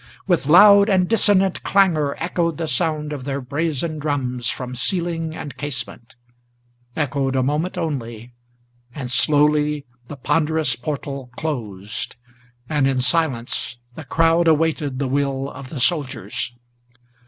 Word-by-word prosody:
With 175 -8 +1
loud 200 +5 +8
and 185 -2 +3
dissonant 195 -3 +3
clangor 165 -8 +2
Echoed 170 -2 -1
the 165 - -3
sound 155 -2 0
of 140 -3 -6
their 140 +1 -3
brazen 155 +3 -2
drums 125 -6 -2
from 125 -1 -4
ceiling 165 +2 -1
and 145 - -7
casement, 130 -3 -5 0.8
Echoed 140 -3 -1
a 130 - +2
moment 150 +7 -1
only, 120 -8 -4 0.6
and 130 -4 -4
slowly 150 +1 +2 0.2
the 145 - -8
ponderous 155 -1 +1
portal 135 0 -5
Closed, 110 -9 -4 0.5
and 145 -2 +1
in 135 -1 +1
silence 125 -5 0 0.2
the 160 - -8
crowd 165 +4 +2
awaited 155 -4 +1
the 135 0 -1
will 140 0 -1
of 135 -2 -10
the 150 - -6
soldiers. 130 - -1
145 Hz, 130 wpm, -21 LUFS, 130-165 Hz, 0.8 s, loud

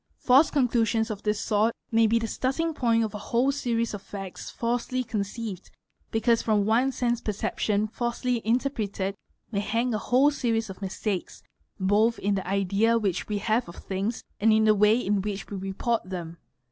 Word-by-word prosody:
False 270 +5 +5
conclusions 230 -5 +1
of 205 - -5
this 210 -1 0
sort 215 +2 +1 0.2
may 225 0 +4
be 230 +2 +3
the 230 - -1
starting 270 +8 -1
point 230 -5 +2
of 220 - -3
a 210 - -5
whole 240 +6 +1
series 235 -5 -1
o 205 - -4
facts 195 -1 -8
falsely 245 +2 -1
conceived, 210 -3 -4 0.4
because 230 +1 +2
from 210 -3 +2
one 240 +5 +3
sense 240 -2 -1
perception 210 0 -1
falsely 240 +1 -2
inter=" 250 +5 +1
preted 200 -5 -3 0.4
may 200 - 0
hang 230 +4 0
a 215 - 0
whole 265 +7 +3
series 225 -6 -1
of 190 - -12
mistakes, 195 0 -4 0.4
both 210 +4 +3
in 205 +1 0
the 190 -2 -2
idea 200 +4 +2
whi 205 -5 +1
we 210 - -1
have 220 +1 0
of 170 - -10
things 200 +4 -3 0.2
and 225 +2 +4
in 220 0 +4
the 215 0 +5
way 210 +2 +4
in 205 -4 0
which 205 0 -5
we - - -3
report 195 +5 -1
them. 175 -3 -6
220 Hz, 185 wpm, -26 LUFS, 200-235 Hz, 0.4 s, False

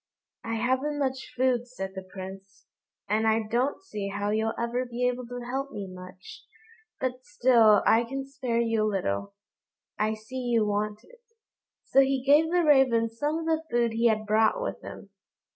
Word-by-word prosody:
"I 225 0 -3
haven't 260 +6 0
much 265 -2 -2
food," 250 -1 +1
said 190 -6 -6
the 190 - -6
Prince, 190 0 -10 0.4
"and 215 +2 +1
I 220 0 +2
don't 250 - -1
see 210 - -5
how 205 +1 -2
you'll 220 +1 0
ever 235 +2 -1
be 245 0 -1
able 250 0 -3
to 245 0 -6
help 270 +3 -3
me 200 -2 -6
much; 185 0 -11 0.6
but 255 0 -3
still 240 -7 +4
I 230 +1 +5
can 270 +3 -5
spare 255 -4 -2
you 225 -2 +1
a 215 - +2
little. 195 - -2 0.6
I 215 +1 +1
see 220 +4 -9
you 240 -3 +1
want 210 +1 -2
it." 485 - -20 0.6
So 270 - +3
he 270 -1 +1
gave 295 +3 +5
the 350 0 +2
raven 260 -6 +4
some 290 +7 -2
of 325 - -4
the 320 -1 +1
food 235 -2 +1
he 230 +1 +2
had 215 -1 +1
brought 220 - +3
with - - -4
him. - - -10
235 Hz, 180 wpm, -27 LUFS, 215-260 Hz, 0.6 s, I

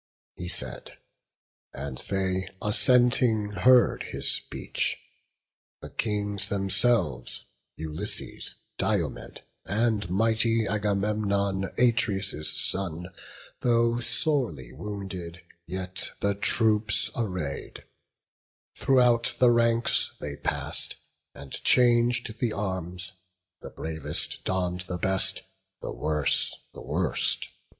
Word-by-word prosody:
He 90 - -6
said, - - -3 0.8
and 70 -1 -6
they 95 -1 -1
assenting 110 0 +4
heard 125 +6 +4
his - - 0
speech. - - -2 0.8
The - - -9
Kings 105 -2 -2
themselves, 100 - 0 0.3
Ulysses, 80 0 -6 0.2
Diomed, - - -2 0.2
And 105 -1 0
mighty 115 +3 +2
Agamemnon, 100 -1 0
Atreus' 110 -10 +1
son, 90 -1 -1 0.5
Though 115 -1 +2
sorely 120 - +1
wounded, 90 0 -7 0.2
yet 95 0 -4
the 100 0 +1
troops 105 0 +2
array'd; 90 - -4 0.9
Thro'out 125 -2 +3
the 125 -1 +5
ranks 115 0 +3
they 75 -1 -5
pass'd, - - 0 0.4
and 70 -2 -11
chang'd 120 -1 +4
the 115 -4 0
arms; 90 -2 -4 0.5
The - - -8
bravest 80 -2 -3
donn'd 90 -1 -1
the 90 - -3
best, 95 +2 +1 0.4
the - - -6
worse 75 -2 +1 0.2
the - - -10
worst. - - +1
100 Hz, 95 wpm, -27 LUFS, 90-115 Hz, 0.9 s, the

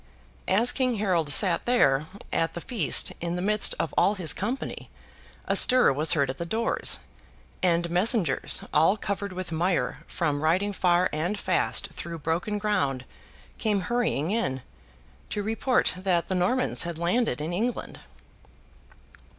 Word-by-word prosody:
As 225 +6 +3
King 255 -2 0
Harold 185 -7 0
sat 170 - +3
there 150 - +3 0.3
at 165 0 0
the 170 - -5
feast, 210 - 0
in 170 0 -2
the - - -3
midst 210 +1 +2
of - - -2
all 205 - +3
his 180 -5 +1
company, 240 +7 -4 0.6
a - - 0
stir 250 - +5
was 150 +4 +2
heard 140 -4 +1
at 135 - -12
the - - -2
doors; 225 +6 +1 0.6
and 170 -1 +2
messengers 180 - +1
all 160 +7 +4
covered 200 0 -3
with 185 -2 -6
mire 165 -5 0
from 150 -4 -2
riding 185 +6 +1
far 180 -1 +2
and 170 +7 -1
fast - - 0
through 170 -1 -7
broken 165 +7 -2
ground 140 -12 -1 0.5
came 210 -3 0
hurrying 195 - -1
in, 135 - -1 0.7
to 205 - -3
report 225 +4 +1
that 180 -2 -1
the - - 0
Normans 190 +8 +1
had 170 -2 -3
landed 175 - 0
in 155 +3 -4
England. 235 +7 -3
180 Hz, 150 wpm, -26 LUFS, 165-210 Hz, 0.7 s, stir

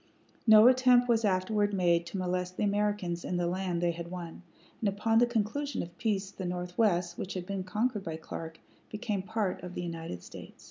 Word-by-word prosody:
No 215 0 +9
attempt 250 -1 +5
was 230 -2 +3
afterward 205 +1 +1
made 170 -2 +2
to 195 - -5
molest 180 0 -2
the - - 0
Americans 205 -4 0
in 180 - -2
the 175 - 0
land 180 -1 -1
they 175 - +3
had 170 0 -7
won, 175 -2 -7 0.4
and 210 - +1
upon 225 +3 +2
the 240 - +5
conclusion 240 +5 -1
of 170 0 -11
peace 200 -4 -1
the 195 - -7
Northwest, 180 0 0
which 190 - -4
had 180 -1 -4
been 195 0 -3
conquered 210 +3 -1
by 165 -3 -4
Clark, 160 0 -7 0.3
became 210 -2 -2
part 205 -1 -2
of 180 0 -8
the 180 - -3
United 165 - -6
States. - - -11
190 Hz, 195 wpm, -30 LUFS, 175-215 Hz, 0.4 s, No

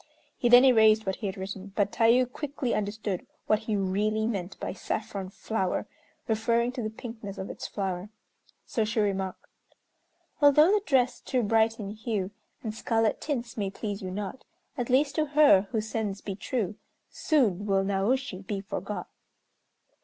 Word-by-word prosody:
He 240 - +1
then 245 +2 +9
erased 220 -3 +6
what 190 -1 -1
he 210 - -3
had 195 +1 -5
written, 195 +1 -6
but 205 -1 +1
Tayû 235 +2 +4
quickly 275 -1 -3
understood 205 -2 -2 0.2
what 215 - +3
he 220 -1 -2
really 210 +3 0
meant 195 -5 -3
by - - -3
"saffron 195 -1 -4
flower," 190 -1 -2 0.4
referring 230 +2 +1
to 255 -1 -5
the 215 - -2
pinkness 220 -3 -8
of 190 - -5
its - - -6
flower, 190 -1 -3 0.6
so 225 - 0
she 220 +1 -1
remarked: 195 -3 -1 1.0
"Although 300 +4 +7
the 420 0 +3
dress 255 -2 +2
too 255 -2 0
bright 225 +1 +2
in 200 -1 -5
hue, 210 -3 -3 0.3
And 220 -2 -3
scarlet 225 0 0
tints 255 -5 -3
may 200 -2 -1
please 200 0 -5
you 185 - -4
not, 205 +6 -5 0.3
At 245 -3 -3
least 275 +3 +3
to 310 - +3
her, 210 -10 +7
who 225 -3 0
sends, 215 -2 -3
be 195 - -5
true, 210 -1 -2 0.3
Soon 210 - +1
will 195 -1 +3
Naoshi 195 +1 0
be 205 -2 -2
forgot." 205 +1 -5
215 Hz, 165 wpm, -28 LUFS, 195-240 Hz, 1.0 s, then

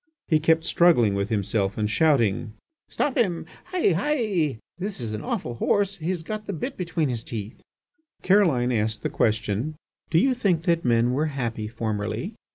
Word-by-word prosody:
He 155 - +4
kept 160 +1 +3
struggling 165 - +4
with 100 +1 -1
himself 100 -2 0
and 105 -1 +1
shouting: 115 -6 +2 0.3
"Stop 280 - -1
him, 180 -9 +1 0.2
Hi! 360 - +1
Hi! 195 - 0 0.2
This 200 -1 -4
is 115 -3 -4
an 105 - -4
awful 120 - -3
horse, 200 - +1
he 165 +1 -4
has 180 -3 -2
got 215 +4 -5
the 200 - -2
bit 250 - -4
between 170 -4 -1
his 120 -2 -3
teeth." 110 -1 -7 0.6
Caroline 165 -11 +3
asked 110 -1 -1
the - - 0
question: 110 +6 0 0.3
"Do 160 - +2
you 260 +9 +4
think 190 -9 +1
that 170 -2 +1
men 120 0 +3
were 150 +4 +1
happy 115 -7 -3
formerly?" 110 - -3
150 Hz, 170 wpm, -25 LUFS, 110-180 Hz, 0.6 s, He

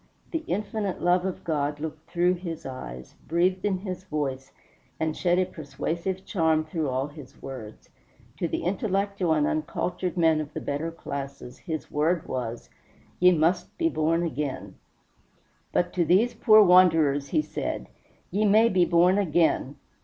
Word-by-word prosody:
The 325 -1 -2
infinite 205 0 -2
love 180 +1 +3
of 185 - -5
God 145 -2 -1
looked 155 0 -7
through 175 +1 +2
his 170 -3 -6
eyes, 65 - -8
breathed 180 +3 +1
in 200 -2 +1
his 185 -1 -6
voice, 140 -6 -3 0.5
and 160 -1 -1
shed 175 -1 +1
a 185 - +3
persuasive 170 +5 -4
charm 160 -5 +2
through 155 -2 -2
all 130 +1 -1
his 145 -2 -12
words. 115 -5 -9 0.5
To - - -1
the - - -3
intellectual 195 -1 0
and 155 0 0
cultured 180 0 -3
men 160 -2 +3
of 150 0 -8
the - - -2
better 145 +3 -3
classes 140 -6 -7
his 160 -3 -5
word 160 +3 +1
was, 120 -2 -4 0.5
"Ye 180 0 +7
must 170 +2 +1
be 330 -1 +2
born 165 - +1
again;" 150 -4 -3 1.0
but 175 - 0
to 180 - +2
these 190 +9 +3
poor 215 -2 +6
wanderers 165 -7 +5
he 310 - +1
said, - - -4 0.4
"Ye 210 - +1
may 215 +2 +5
be 185 -3 +3
born 180 +4 +4
again. 160 -6 +1
165 Hz, 155 wpm, -26 LUFS, 150-185 Hz, 1.0 s, Ye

